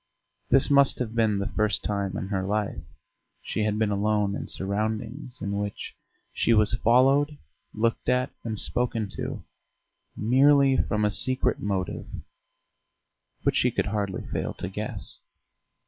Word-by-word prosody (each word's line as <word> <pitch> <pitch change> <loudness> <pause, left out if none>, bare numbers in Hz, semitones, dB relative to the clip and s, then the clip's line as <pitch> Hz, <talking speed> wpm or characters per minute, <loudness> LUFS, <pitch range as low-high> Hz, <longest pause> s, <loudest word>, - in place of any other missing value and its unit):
This 135 +1 +4
must 140 -1 +5
have 115 -3 -3
been 110 -3 +2
the 100 - -2
first 105 -2 0
time 100 -2 -2
in 95 - -5
her 95 -2 -1
life 105 -4 -2 0.6
she 110 - -2
had 105 0 0
been 110 -1 +1
alone 105 0 +1
in - - -5
surroundings 110 +6 -3
in 100 - -2
which 100 0 -5 0.4
she 115 - +2
was 105 -1 +5
followed, 135 +6 +3 0.3
looked 115 +1 -1
at, 125 +1 +1
and 110 -3 -3
spoken 115 -3 -1
to - - -5 0.7
merely 135 +4 +4
from 105 0 0
a 105 - +1
secret 130 +5 +3
motive 95 -3 -3 1.4
which - - +2
she - - +3
could - - -1
hardly 100 -2 -3
fail - - -4
to - - -5
guess. - - -4
110 Hz, 145 wpm, -26 LUFS, 100-125 Hz, 1.4 s, must